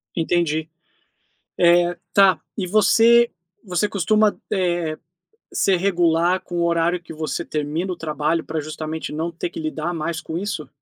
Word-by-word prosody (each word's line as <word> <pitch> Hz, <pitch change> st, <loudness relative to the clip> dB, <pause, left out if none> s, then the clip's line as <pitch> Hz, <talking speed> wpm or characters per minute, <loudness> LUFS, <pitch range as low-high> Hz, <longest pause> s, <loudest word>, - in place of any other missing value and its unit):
Entendi, 160 Hz, -2 st, 0 dB, 0.9 s
eh, 175 Hz, 0 st, +4 dB, 0.2 s
tá. 195 Hz, -2 st, +5 dB, 0.2 s
E 195 Hz, -, -2 dB
você 230 Hz, +4 st, +5 dB, 0.4 s
você 180 Hz, +3 st, +1 dB
costuma, 210 Hz, +2 st, +2 dB, 0.2 s
eh, 175 Hz, -4 st, 0 dB, 0.6 s
ser 195 Hz, -, +2 dB
regular 175 Hz, -1 st, +2 dB
com 175 Hz, -, -7 dB
o 170 Hz, -, +1 dB
horário 170 Hz, +1 st, +1 dB
que 170 Hz, -, -11 dB
você 155 Hz, 0 st, -3 dB
termina 155 Hz, +5 st, -2 dB
o -, -, -6 dB
trabalho 155 Hz, 0 st, -1 dB
pra 160 Hz, 0 st, -3 dB
justamente 155 Hz, +1 st, -5 dB
não 160 Hz, +3 st, -2 dB
ter 170 Hz, -, -5 dB
que 330 Hz, -, -7 dB
lidar 175 Hz, -, -3 dB
mais 165 Hz, 0 st, -3 dB
com 160 Hz, -, -6 dB
isso? 180 Hz, -4 st, -4 dB
170 Hz, 150 wpm, -22 LUFS, 160-190 Hz, 0.9 s, tá